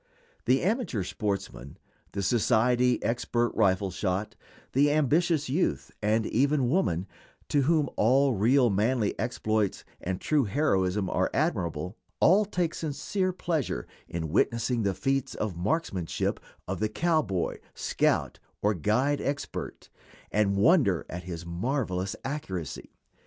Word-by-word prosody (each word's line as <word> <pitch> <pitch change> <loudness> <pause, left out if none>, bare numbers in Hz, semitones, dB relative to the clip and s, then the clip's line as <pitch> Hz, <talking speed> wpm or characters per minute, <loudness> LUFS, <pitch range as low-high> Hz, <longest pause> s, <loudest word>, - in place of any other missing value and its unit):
The 130 +1 +3
amateur 190 - 0
sportsman, 95 - -4 0.4
the 100 - -2
society 125 +3 +2
expert 120 0 0
rifle 95 0 +2
shot, 95 +2 -2 0.4
the 145 +3 +4
ambitious 155 +2 +2
youth, 150 +8 -1
and 110 +1 +2
even 135 0 +2
woman, 95 - +1 0.4
to 145 - +3
whom 150 +1 +2
all 130 +4 +4
real 120 +4 +4
manly 110 +2 +1
exploits 110 -3 -1 0.2
and 90 +1 -3
true 150 -4 +2
heroism 100 -6 +1
are - - +1
admirable, 85 +3 -1 0.2
all 200 +5 +5
take 180 -5 -1
sincere 165 +5 -2
pleasure 160 - -2 0.2
in 80 -2 -4
witnessing 115 - +1
the 100 -3 0
feats 135 +6 -1
of 105 -5 -3
marksmanship 95 - -1 0.3
of - - -3
the 110 +1 0
cowboy, 155 - 0 0.2
scout, - - 0 0.2
or 105 +1 +3
guide 125 - +1
expert, 140 0 -4 0.4
and 100 -2 +2
wonder 100 - +4
at 90 +1 -6
his 85 -2 -6
marvelous 95 0 -2
accuracy. 95 - -5
115 Hz, 125 wpm, -28 LUFS, 95-145 Hz, 0.4 s, all